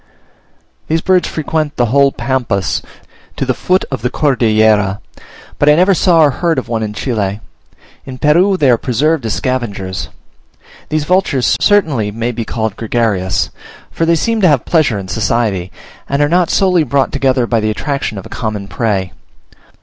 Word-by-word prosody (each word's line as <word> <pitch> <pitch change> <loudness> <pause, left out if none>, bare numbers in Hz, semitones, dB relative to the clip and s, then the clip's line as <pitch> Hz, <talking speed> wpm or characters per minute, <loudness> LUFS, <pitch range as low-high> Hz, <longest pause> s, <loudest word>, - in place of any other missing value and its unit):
These 160 +1 0
birds 185 0 +2
frequent 155 -1 -2
the 120 -1 0
whole 140 0 +4
Pampas 120 -10 -1 0.5
to - - -2
the - - +1
foot 185 +1 0
of 130 - -3
the 125 - 0
Cordillera, 110 -8 +2 0.6
but 145 - +4
I 150 - +6
never 185 +4 +4
saw 175 -2 +3
or 145 - +4
heard 165 +2 -1
of 130 - -3
one 115 -2 -2
in 110 -1 -3
Chile; 105 -4 -2 0.6
in 130 -1 -9
Peru 175 +8 +3
they 140 -7 +3
are 120 - +2
preserved 135 +2 0
as 110 - -1
scavengers. 105 -8 -3 0.8
These 155 -1 0
vultures 180 -6 +1
certainly 155 - +2
may 115 +3 -3
be 115 -1 -5
called 110 -3 -3
gregarious, 110 -5 -1 0.4
for 165 - -1
they 170 - +4
seem 225 +6 0
to 185 - +5
have 145 -7 +2
pleasure 155 -10 +2
in 95 -1 -6
society, 100 -3 -1 0.4
and 140 - 0
are 145 - +3
not 175 +2 +2
solely 185 -3 +3
brought 140 0 0
together 130 -3 +1
by 115 -1 0
the 110 0 -1
attraction 135 0 -3
of 95 - -7
a - - -10
common 105 -3 -4
prey. 100 -5 -2
130 Hz, 175 wpm, -15 LUFS, 110-155 Hz, 0.8 s, I